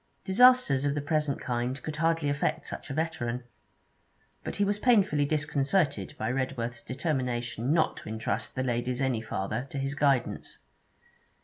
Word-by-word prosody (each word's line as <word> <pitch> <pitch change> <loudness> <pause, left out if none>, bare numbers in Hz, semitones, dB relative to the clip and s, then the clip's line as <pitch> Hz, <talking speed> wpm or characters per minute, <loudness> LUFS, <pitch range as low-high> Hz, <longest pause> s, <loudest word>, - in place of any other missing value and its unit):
Disasters 250 - +5
of 145 0 +1
the - - 0
present 150 -1 0
kind 125 +2 -2
could 155 -1 -5
hardly 165 -1 +1
affect 145 0 0
such - - -7
a - - -3
veteran. 125 -7 -2 1.0
But - - -4
he 200 - +2
was 205 +1 0
painfully 200 - +4
disconcerted 145 - 0
by 110 +2 -1
Redworth's 125 -3 -2
determination 125 -4 -2
not 160 0 +2
to - - -8
entrust 110 +1 -3
the 130 - -1
ladies 125 0 -1
any 130 -4 0
farther 110 +3 -3
to - - -6
his 135 +1 -1
guidance. 140 -4 0
140 Hz, 150 wpm, -29 LUFS, 120-155 Hz, 1.0 s, Disasters